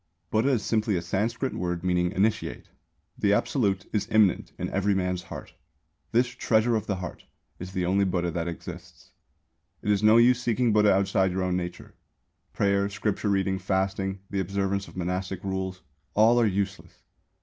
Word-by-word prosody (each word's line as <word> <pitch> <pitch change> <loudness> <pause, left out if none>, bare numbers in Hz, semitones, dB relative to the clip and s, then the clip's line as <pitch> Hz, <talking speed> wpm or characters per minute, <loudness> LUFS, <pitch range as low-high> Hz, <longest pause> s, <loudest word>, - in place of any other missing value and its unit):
Buddha 110 +5 +2
is 120 -6 +1
simply 110 -2 +1
a 85 - 0
Sanskrit 115 +6 -1
word 90 -1 -3
meaning 90 -1 +1
"initiate." 105 +2 -1 0.5
The 100 -1 +3
Absolute 105 -4 +1
is 105 - 0
immanent 105 -4 +3
in - - -3
every 100 +1 +1
man's 90 -1 -1
heart. - - -9 0.6
This 120 +2 +4
"treasure 120 -2 +1
of 110 -1 -2
the 100 - 0
heart" 90 -2 -7 0.3
is 90 +1 -7
the 90 -2 -1
only 95 +3 +2
Buddha 90 -2 0
that 85 +1 -3
exists. 85 0 -9 0.7
It 105 - +1
is 100 -1 +2
no 110 +1 +6
use 125 +1 +5
seeking 120 -1 +1
Buddha 105 -1 +5
outside 95 -1 +2
your 95 +1 -1
own 90 -1 0
nature. 90 -1 -5 0.6
Prayer, 100 0 +1
scripture 105 +1 -2
reading, 95 -1 +1
fasting, 95 0 -1
the 100 - -1
observance 100 +1 -1
of - - -13
monastic 90 +1 -3
rules 95 -1 -3 0.3
all 115 +3 +5
are 115 - +4
useless. 100 0 -3
95 Hz, 170 wpm, -27 LUFS, 90-110 Hz, 0.7 s, no